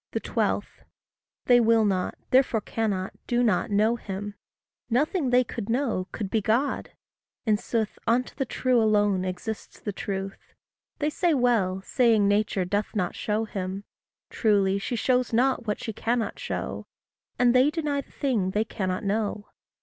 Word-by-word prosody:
12. - - -1 0.8
They 245 -1 +6
will 225 -1 +4
not, 185 -3 0
therefore 255 -4 +4
cannot, 200 -4 -2
do 245 0 +2
not 210 -6 +2
know 215 +3 +2
him. 205 -1 -6 0.6
Nothing 285 +4 +1
they 250 +1 +5
could 230 -3 -6
know, 230 -7 0
could 210 - -4
be 220 - +2
God. 235 +8 0 0.6
In 215 -2 +4
sooth, 220 0 -2
Unto 240 +2 +1
the 275 - -1
true 255 -1 +2
alone 205 -3 +2
exists 185 +4 -5
the 205 - -4
truth. 195 0 -6 0.4
They 300 +1 0
say 340 0 +2
well, 210 -7 +1
saying 225 -2 +3
Nature 205 -2 +1
doth 205 +4 -2
not 180 -4 0
show 215 +1 -1
him: 195 -1 -4 0.5
Truly 200 -3 +2
she 240 - -3
shows 250 0 +1
not 250 0 +2
what 210 - -1
she 225 - -5
cannot 230 +2 -1
show; - - -4 0.5
And 245 -1 +4
they 255 +3 +5
deny 300 -3 -1
the - - -22
thing 235 -10 0
they 210 +3 0
cannot 185 -4 -3
know. 205 0 -2
220 Hz, 155 wpm, -26 LUFS, 200-245 Hz, 0.8 s, They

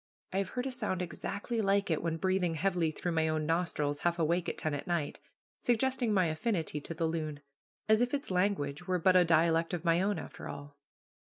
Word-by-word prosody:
I 190 - +1
have 195 - 0
heard 250 - 0
a 270 - -2
sound 210 -8 -1
exactly 205 +6 -3
like 195 -2 +2
it 160 - +1
when 165 -1 -1
breathing 185 -1 +1
heavily 175 -1 +1
through 175 +3 -3
my 160 -1 +2
own 155 -1 0
nostrils, 150 -3 0
half 175 0 +1
awake 170 +2 +1
at - - -5
ten 155 - -2
at 145 - -4
night, 170 -4 -1 0.4
suggesting 245 0 +1
my 190 -3 +3
affinity 160 -2 -1
to 165 - -7
the 165 - 0
loon; 155 -3 -3 0.5
as 220 +1 +5
if 245 0 +2
its 285 -6 -2
language 180 -4 0
were 185 -1 +2
but 185 +2 +4
a 180 - +7
dialect 165 +1 +3
of 175 0 -7
my 170 +1 +4
own, 200 0 +1
after - - -8
all. 145 0 -8
175 Hz, 215 wpm, -32 LUFS, 160-195 Hz, 0.5 s, a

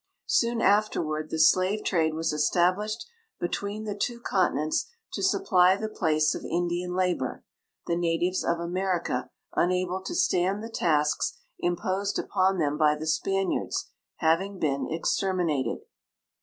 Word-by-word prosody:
Soon 235 -1 +1
afterward 165 -7 +1
the - - -3
slave 185 +6 +3
trade 160 -4 +1
was 160 -1 -1
established 185 +8 +1 0.3
between 200 +4 -3
the 210 -1 -3
two 235 +4 -2
continents 175 -8 0 0.2
to - - -3
supply 190 - +4
the 220 +2 -3
place 155 -7 +1
of - - -6
Indian 175 +1 -2
labor, 180 -8 -1 0.4
the 170 - 0
natives 175 +2 0
of 170 - +1
America, 175 -6 -1 0.2
unable 180 +1 +1
to - - -5
stand 190 +4 +1
the 230 - -7
tasks 150 -7 +1 0.2
imposed 185 +3 -1
ui>on 190 -1 +1
them 150 -3 0
liy 150 -1 +4
the 155 - -5
Spaniards, 195 +4 -1 0.2
having 185 +5 +1
been 140 -5 -1
extermi 180 +3 0
nated. 145 -5 -1
180 Hz, 135 wpm, -27 LUFS, 160-195 Hz, 0.4 s, supply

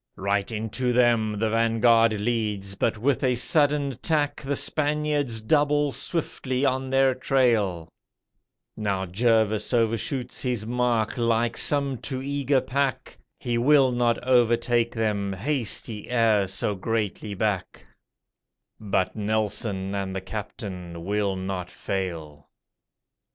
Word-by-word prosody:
Right 100 +2 -1
into 115 +3 -2
them 115 -3 +2
the 110 +1 0
'Vanguard' 115 0 +3
leads, 105 -3 -2
but 110 +3 -1
with 130 +5 0
a 125 -1 +2
sudden 145 +2 +2
tack 150 -3 0
The 140 0 -2
Spaniards 150 -5 0
double 145 +3 +2
swiftly 135 -4 -2
on 130 0 0
their 135 0 +3
trail; 115 - +1 0.9
Now 100 -3 -2
Jervis 110 +3 +1
overshoots 115 +3 -1
his 125 -5 -2
mark, 120 -1 0
like 115 0 +1
some 140 -4 +1
too 130 -2 -4
eager 140 0 0
pack, 135 0 -2 0.2
He 120 -1 -1
will 135 0 +4
not 120 -1 +1
overtake 120 -1 +2
them, 105 -3 -1
haste 120 +3 0
he 105 -3 -8
e'er 110 -5 +2
so 100 +2 0
greatly 105 0 -3
back, 100 -2 -2 0.9
But 100 -3 -1
Nelson 105 -2 -2
and 95 -1 -3
the 95 - -3
'Captain' 90 -4 -7
will 100 -1 0
not 95 -1 -4
fail. 80 -6 -5
115 Hz, 120 wpm, -25 LUFS, 100-130 Hz, 0.9 s, will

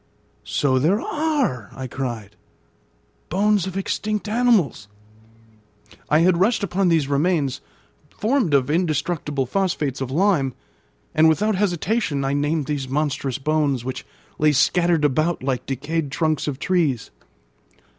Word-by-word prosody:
"So 130 -2 +1
there 175 +10 +2
are!" 285 - -1
I 130 - -5
cried; 120 -5 -5 0.9
"bones 200 +1 +2
of 190 0 -5
extinct 210 +2 -2
animals." 210 - +2 1.2
I 155 +2 +4
had 175 0 +3
rushed 220 +3 +2
upon 195 0 +1
these 160 -5 +2
remains, 145 -1 0 0.5
formed 220 - +1
of 135 +1 +2
indestructible 155 -4 -1
phosphates 150 -4 -1
of 130 - -3
lime, 150 -4 +1 0.6
and 160 +1 +5
without 210 +7 +2
hesitation 180 -5 0
I 135 - 0
named 145 +1 0
these 140 -2 -3
monstrous 140 -2 -1
bones, 145 -3 0
which 130 - -4 0.4
lay 150 0 +4
scattered 170 +3 +3
about 155 +3 0
like 130 -2 -2
decayed 145 +3 -2
trunks 155 +1 0
of 140 -3 -2
trees. 155 - 0
155 Hz, 125 wpm, -22 LUFS, 135-185 Hz, 1.2 s, and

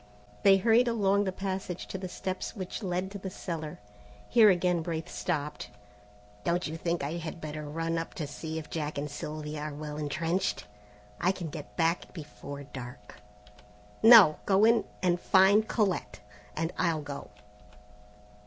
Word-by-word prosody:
They 195 -1 +7
hurried 230 +4 +4
along 205 -3 +2
the 190 - 0
passage 190 -2 -4
to - - -4
the 185 -1 -5
steps 185 +4 -4
which 190 +2 -5
led 185 -1 -2
to 200 - -6
the 190 - -5
cellar. 165 -4 -5 0.5
Here 225 -3 +7
again 180 -2 +2
Braith 160 -1 -4
stopped. 150 -4 -3 0.7
"Don't 175 +1 0
you 160 - -4
think 170 -1 -2
I 150 +4 -2
had 165 0 -6
better 150 -1 -6
run 165 +2 -1
up 165 - -6
to 155 - -3
see 160 +2 -6
if 160 - -7
Jack 150 -2 -3
and 145 0 -3
Sylvia 150 +1 -5
are 150 -1 -5
well 150 0 -6
entrenched? 165 +5 -1 0.5
I 180 - +3
can 180 -4 -5
get 150 -1 -9
back 165 0 0
before 145 -3 -8
dark." 125 -7 -10 0.8
"No. 220 -9 +9
Go 200 +2 +5
in 230 0 +4 0.2
and 175 -1 +2
find 200 +3 +5
Colette, 205 -5 -1 0.4
and 165 +2 -1
I'll 160 -3 +1
go." 140 -1 -7
170 Hz, 160 wpm, -29 LUFS, 150-190 Hz, 0.8 s, No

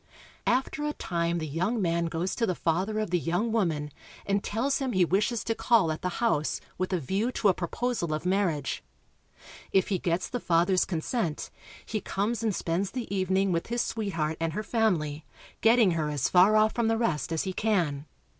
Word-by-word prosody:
After 260 +4 +1
a 300 0 -1
time 170 -5 -1
the 160 - -3
young 185 - -1
man 170 -3 +1
goes 165 +3 -2
to 230 - 0
the 185 - 0
father 185 +7 0
of 215 -4 -2
the 180 - +2
young 175 +8 0
woman, 160 -9 0 0.3
and 200 0 0
tells 250 +6 0
him 265 -3 -2
he 185 -1 +4
wishes 210 +6 +1
to 225 - 0
call 225 -6 +3
at 155 - -4
the 180 - -1
house 155 -11 +1 0.2
with 185 +1 -1
a 185 - +1
view 195 - -1
to 210 - +3
a - - +4
proposal 180 +1 -2
of 155 +2 -2
marriage. 180 -7 0 0.9
If 190 - +2
he 190 -3 0
gets 170 +1 -1
the 245 - -3
father's 180 0 +2
consent, 170 -1 -2 0.3
he 215 -2 -3
comes 210 +4 -1
and 220 -4 0
spends 175 +4 -1
the 235 -3 -4
evening 190 0 +1
with 170 -1 -1
his 240 +1 0
sweetheart 165 -8 -2
and 165 -1 -1
her 210 +5 -3
family, 170 -10 0 0.4
getting 225 -3 +5
her 160 -3 -1
as 145 -3 0
far 190 +4 +6
off 215 0 +4
from 235 -2 +1
the 225 0 +2
rest 165 - -1
as 160 - 0
he 190 - -3
can. 170 -10 0
190 Hz, 200 wpm, -28 LUFS, 165-220 Hz, 0.9 s, far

